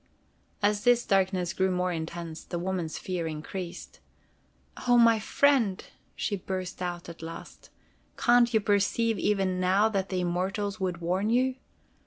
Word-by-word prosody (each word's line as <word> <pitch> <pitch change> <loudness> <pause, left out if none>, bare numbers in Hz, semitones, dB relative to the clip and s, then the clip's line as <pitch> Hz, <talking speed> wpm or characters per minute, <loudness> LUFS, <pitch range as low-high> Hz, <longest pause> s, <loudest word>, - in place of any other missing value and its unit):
As 205 0 +2
this 245 -1 +4
darkness 190 -2 +1
grew 190 0 +1
more 180 0 0
intense, 165 0 -5
the 175 - -5
woman's 175 -2 -3
fear 180 -3 -3
increased. 170 +3 -7 0.9
"Oh, 245 0 +6
my 230 -2 +6
friend!" 230 -4 +2 0.3
she 205 - -1
burst 185 -1 -5
out 175 -1 -4
at 170 -1 -10
last. 165 0 -9 0.5
"Can't 240 0 +4
you 220 -2 +3
perceive 210 +1 +1
even 190 -2 +1
now 190 +4 +3
that 195 -3 -2
the 185 -1 -1
Immortals 190 +4 -2
would 180 -3 -2
warn 185 +5 0
you? 255 +2 +2
190 Hz, 145 wpm, -28 LUFS, 175-215 Hz, 0.9 s, Oh